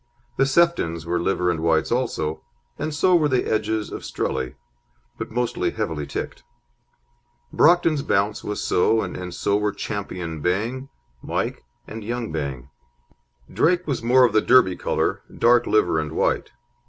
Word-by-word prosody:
The 135 - +4
Seftons 135 - +1
were 85 +1 0
liver 90 -1 +1
and 85 - -3
whites 80 -1 +1
also, 80 -11 -1 0.4
and 155 - -2
so 180 +4 +3
were 155 -3 +3
the 130 -3 +1
Edges 110 -1 -1
of - - -6
Strelly, 65 -2 -3 0.6
but - - -4
mostly 120 +1 -1
heavily 75 -3 -3
ticked. - - -5 1.1
Brockton's 165 -3 +4
Bounce 105 -6 0
was 105 - -3
so, 110 +5 +2
and 90 -1 -6
so 100 +3 0
were 105 0 0
Ch. - - -7 0.2
Bang, 90 - -3 0.3
Mike, - - -3 0.2
and 110 0 -8
Young 120 +1 -4
Bang. 70 -4 -5 0.8
Drake 180 +1 +2
was 140 -5 -2
more 125 +2 +5
of 120 - 0
the 110 - +4
Derby 125 -8 +5
colour; - - -1 0.2
dark 120 0 +4
liver 90 -7 +2
and 75 0 -4
white. - - 0
105 Hz, 150 wpm, -23 LUFS, 85-130 Hz, 1.1 s, more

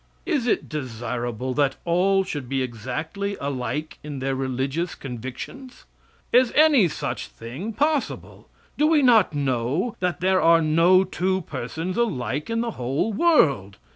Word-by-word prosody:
Is 290 -10 0
it - - +1
desirable 120 -3 -4
that 140 -1 +1
all 190 +3 +3
should 145 -9 -6
be 135 -1 0
exactly 155 - -4
alike 140 +2 -4
in 150 -2 -7
their 135 +1 -2
religious 135 +6 -2
convictions? 130 - -8 0.5
Is 250 0 +5
any 295 - +6
such 155 - -4
thing 130 - -7
possible? 295 +5 -2 0.3
Do 300 - +4
we 310 -3 +4
not 225 - +5
know 140 - -1
that 180 -1 -1
there 185 +1 +2
are 165 0 +6
no 165 +4 +4
two 190 0 -1
persons 160 +5 -5
alike 150 - -1
in 230 0 0
the 235 -1 -2
whole 135 - -1
world? 140 - +3
160 Hz, 140 wpm, -24 LUFS, 130-200 Hz, 0.5 s, any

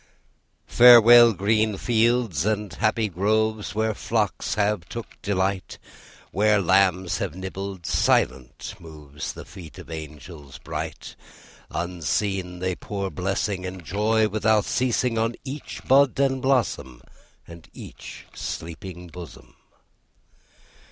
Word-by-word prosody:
Farewell, 120 -1 +8
green 105 +1 +1
fields 115 - +1
and 105 -2 -2
happy 110 0 0
groves, 105 +3 -1
Where 110 0 0
flocks 105 -1 -2
have 105 -4 -1
took 115 -1 -9
delight, 95 -2 -2 0.5
Where 105 +2 +3
lambs 95 -1 +2
have 90 -5 -3
nibbled, 95 -1 -6
silent 65 -3 0
moves 75 -3 -8
The - - -10
feet 85 -5 -12
of - - -11
angels 75 -2 -9
bright; - - -6 0.5
Unseen, 90 +2 -2
they 90 0 -2
pour 100 -1 -5
blessing, 95 +1 -2
And 90 -2 -7
joy 110 +4 +1
without 110 0 +1
ceasing, 125 -2 0
On 115 +1 0
each 140 +1 -7
bud 135 0 +4
and 135 -1 +1
blossom, 115 - -1 0.4
And 85 -1 -13
each - - -11
sleeping 90 +2 -7
bosom. 85 0 -12
100 Hz, 110 wpm, -24 LUFS, 90-110 Hz, 0.5 s, Farewell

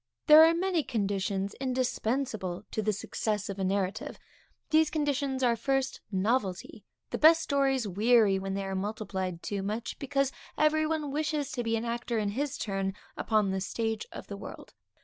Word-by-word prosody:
_ - - -53
There 310 0 +10
are 330 +1 +5
many 360 -1 +1
conditions 200 -5 -1
indispensable 250 -6 -1
to 220 - -1
the 215 0 +1
success 210 0 -2
of 200 0 -5
a - - 0
narrative. 190 0 -1 0.5
These 315 0 +5
conditions 280 -3 -1
are, 240 -2 +4
first, 270 +3 -1
novelty; 200 -1 -1 0.3
the - - -2
best 325 +1 +7
stories 270 -4 +1
weary 210 0 +4
when 195 0 -3
they 195 - -2
are 195 - -3
multiplied 190 -3 -3
too 200 -1 -3
much, 215 +4 -4
because 275 -1 0 0.3
every 310 0 +3
one 305 -3 -2
wishes 300 -1 -1
to 245 - -2
be 230 -1 0
an 225 - -3
actor 235 0 -2
in 210 -2 0
his 280 +6 -2
turn 195 -1 -2 0.2
upon 215 -3 +1
the 190 0 -2
stage 225 +2 -2
of - - -8
the 200 - -7
world. - - -10
225 Hz, 175 wpm, -29 LUFS, 200-275 Hz, 0.5 s, There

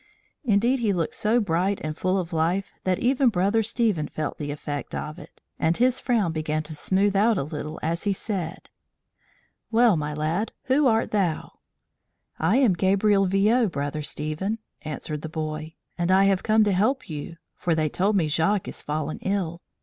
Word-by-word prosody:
Indeed 240 +2 +2
he 215 -4 +1
looked 170 -3 -1
so 220 +3 +2
bright 190 0 0
and 155 0 -3
full 185 +3 0
of 180 -2 -3
life 170 +5 0
that 185 -1 +2
even 260 +1 +3
Brother 200 +2 +2
Stephen 220 -8 0
felt 155 -2 -4
the 145 -1 -4
effect 145 0 -5
of 155 +2 -5
it, - - -14 0.2
and 165 +1 +2
his 255 +1 +3
frown 225 -9 +1
began 155 -1 -2
to 155 +1 -8
smooth 195 +6 +1
out 215 +2 +4
a - - 0
little 155 +1 -6
as 170 +3 -1
he 205 - +2
said: 190 -3 -4 1.0
"Well, 230 -2 +5
my 150 -1 -2
lad, 160 +8 -1
who 270 +2 +3
art 225 -1 +2
thou?" 185 -7 -1 0.8
"I 175 +10 +3
am 255 -8 +4
Gabriel 195 +2 +3
Viaud, 210 +5 +3
Brother 145 +1 -3
Stephen," 155 +9 -3 0.2
answered 150 0 -5
the 160 - -6
boy, 155 0 -5 0.2
"and 175 +1 0
I 190 +1 +6
have 195 -1 +3
come 220 0 +4
to 205 - +2
help 220 +9 +1
you; 160 +2 -6 0.2
for 170 -2 0
they 155 -1 +1
told 195 +7 +1
me 170 -5 +2
Jacques 165 +6 +1
is - - -6
fallen 155 +1 -3
ill. 180 -4 -2
185 Hz, 180 wpm, -25 LUFS, 155-210 Hz, 1.0 s, I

